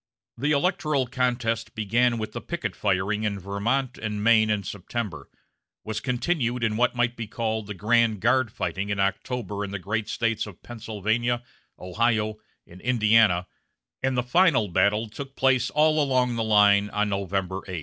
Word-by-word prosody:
The 145 +5 -1
electoral 150 -3 +1
contest 120 -2 -1
began 120 +3 +1
with 110 -1 -4
the - - -6
picket - - -4
firing 100 +1 0
in 105 -2 -1
Vermont 105 +8 -2
and 105 -1 -3
Maine 110 -1 +5
in 105 -1 0
September, 95 - -5 0.5
was 110 0 -3
continued 125 -1 -1
in 110 -1 +1
what 125 +2 +1
might 120 0 +1
be 115 -2 -5
called 110 -1 -3
the 105 - -6
grand 110 +2 +2
guard 125 +1 +2
fighting 100 -2 -3
in 100 -1 -2
October 105 +1 -2
in 100 - -4
the 100 - -4
great 105 +4 -3
States 115 -2 -1
of 100 - -13
Pennsylvania, 115 +1 -2 0.3
Ohio, 110 +3 0 0.3
and 90 +2 -15
Indiana, 110 -6 +3 0.6
and 130 -1 0
the 125 - +1
final 135 - +3
battle 100 +5 +2
took 135 +5 -9
place 130 -1 +2
all 155 0 +3
along 130 -3 +1
the 115 - -1
line 105 -1 +4
on 105 0 0
November 95 -1 -2
8. 90 -3 -4
110 Hz, 165 wpm, -25 LUFS, 100-125 Hz, 0.6 s, Maine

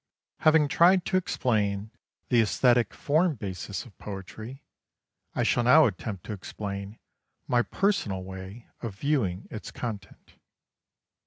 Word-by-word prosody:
Having 155 -1 +5
tried 175 +4 +5
to - - -1
explain 110 - 0 0.4
the 120 -2 +5
aesthetic 120 +2 +3
form 155 +2 +1
basis 95 -3 -5
of 115 - -16
poetry, 110 +7 -8 0.7
I - - +1
shall 120 - +2
now 150 +6 +7
attempt 100 -3 -3
to 105 - -4
explain 100 +1 -6 0.5
my 120 -1 +3
personal 120 - 0
way 95 +4 -9
of 115 -5 -5
viewing 110 -8 -1
its 110 - -6
content. 110 -5 -7
110 Hz, 125 wpm, -27 LUFS, 100-135 Hz, 0.7 s, now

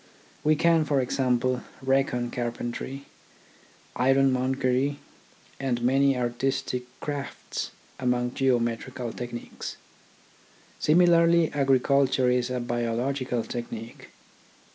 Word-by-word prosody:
We 155 +1 +4
can, 165 +1 +4
for 145 -2 +1
example, 125 -1 +1 0.2
reckon 130 -2 +1
carpentry, 120 +3 -4 0.9
ironmongery, 130 +1 +2 0.6
and 130 -3 -1
many 135 +1 +3
artistic 125 +1 -1
crafts 145 -2 -4 0.3
among 125 -1 0
geometrical 120 -1 -1
techniques. 120 -1 -7 1.0
Similarly 170 0 +4
agriculture 135 -2 +3
is 125 0 +1
a 125 0 -2
biological 120 +1 -1
technique. 115 -1 -7
130 Hz, 80 wpm, -26 LUFS, 120-140 Hz, 1.0 s, We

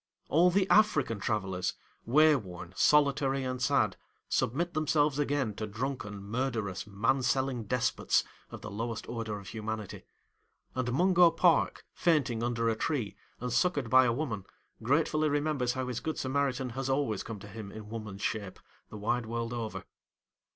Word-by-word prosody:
All 170 +4 +5
the 190 +1 +2
African 150 - +3
travellers, 95 -4 -1 0.3
wayworn, 115 - +2
solitary 140 - +3
and 130 0 -3
sad, 125 - +2 0.3
submit 170 +9 0
themselves 150 -2 +2
again 140 -6 0
to 110 - -3
drunken, 110 -3 -4
murderous, 110 -3 -2
man 115 +7 +1
selling 130 -1 0
despots, 125 +3 +1 0.3
of - - -9
the 110 - -7
lowest 115 +2 -4
order 115 -3 -4
of 100 - -9
humanity; 110 -2 -5 0.7
and 130 -1 -1
Mungo 175 +4 +5
Park, 165 +1 +2
fainting 140 -9 +1
under 115 -1 0
a 115 - +2
tree 110 -6 -2 0.2
and 125 0 -3
succoured 145 -10 +1
by 130 0 +7
a 120 - +3
woman, 115 -7 -3 0.4
gratefully 155 +5 +2
remembers 145 -4 0
how 130 -1 -3
his 125 -2 -3
Good 160 - -3
Samaritan 130 -1 -1
has 135 +2 -3
always 135 -7 0
come 115 - -6
to 100 - -11
him 105 -1 -8
in 110 0 -9
woman's 110 -3 -6
shape, 100 -4 -3 0.3
the 105 - -8
wide 115 +3 -1
world 115 +1 -3
over. 115 -2 -4
125 Hz, 155 wpm, -30 LUFS, 110-145 Hz, 0.7 s, by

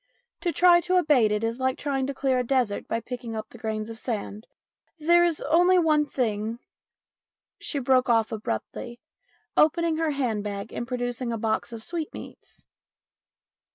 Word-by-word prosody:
To 350 - -1
try 345 0 +6
to 365 +2 0
abate 295 -11 +4
it 210 +1 0
is 230 +2 -2
like 260 0 0
trying 270 -2 -1
to 280 - -3
clear 260 -1 +1
a - - +1
desert 245 -5 0
by 230 - -1
picking 235 -1 -6
up 215 0 -5
the 235 - -13
grains 215 -1 -3
of 225 0 -8
sand. 215 -3 -4 0.5
There 345 +3 +4
is 340 -3 +1
only 350 +5 +4
one 305 -3 +3
thing 220 -3 -2 0.5
" - - -68
She 410 -7 -2
broke 255 -1 +2
off 225 -2 +3
abruptly, 220 - -5 0.6
opening 325 +1 +3
her 325 -1 +1
hand 250 -8 -1
bag 200 0 -5
and 235 - -4
producing 245 -1 -3
a 230 - -2
box 220 +1 -1
of 225 -1 -8
sweetmeats. 335 0 -7
250 Hz, 170 wpm, -26 LUFS, 225-305 Hz, 0.6 s, try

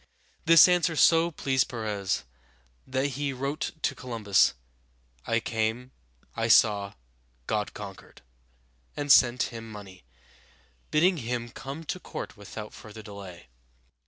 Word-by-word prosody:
This 165 0 +8
answer 175 -2 +2
so 165 +2 +5
pleased 135 -5 0
Perez 105 - -2 0.6
that 130 +1 -1
he 140 +1 -3
wrote 140 +3 -3
to - - +1
Columbus, 115 -6 +1 0.7
"I 115 - +2
came, 115 +3 -2 0.4
I 115 0 -1
saw, 105 -2 +4 0.5
God - - -2
conquered," - - -10 0.7
and 145 -1 0
sent 125 -2 +6
him 115 -1 -8
money, 100 - -11 0.9
bidding 175 +4 +3
him 120 -2 -3
come 135 +6 -8
to 185 - -4
court - - -7
without 105 +1 -9
further 110 0 -11
delay. 100 - -11
120 Hz, 120 wpm, -27 LUFS, 105-140 Hz, 0.9 s, This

